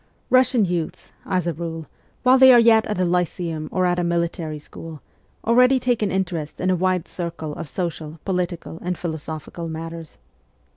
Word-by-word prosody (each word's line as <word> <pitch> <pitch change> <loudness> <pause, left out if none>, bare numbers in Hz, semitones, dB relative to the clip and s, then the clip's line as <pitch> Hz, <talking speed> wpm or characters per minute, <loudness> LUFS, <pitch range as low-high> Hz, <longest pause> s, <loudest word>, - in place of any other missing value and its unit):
Russian 255 -4 +4
youths, 175 -3 -3 0.2
as 180 -2 0
a 170 - 0
rule, 165 0 -5 0.4
while 260 +1 +6
they 260 0 +9
are 240 - +8
yet 225 -1 +5
at 210 -3 -2
a 185 - +3
lyceum 170 -3 -1
or 185 -1 +1
in 175 0 +1
a - - +1
military 170 -2 -1
school, 155 +1 -10 0.5
already 250 +3 +5
take 245 -2 0
an 210 - +1
interest 175 -5 -3
in 185 +1 +1
a - - +3
wide 185 -1 0
circle 170 -3 -5
of 160 -1 -7
social, 160 -2 -4
political, 175 -3 -3
and 180 0 -2
philosophical 160 0 -5
matters. 165 0 -7
175 Hz, 175 wpm, -22 LUFS, 165-190 Hz, 0.5 s, they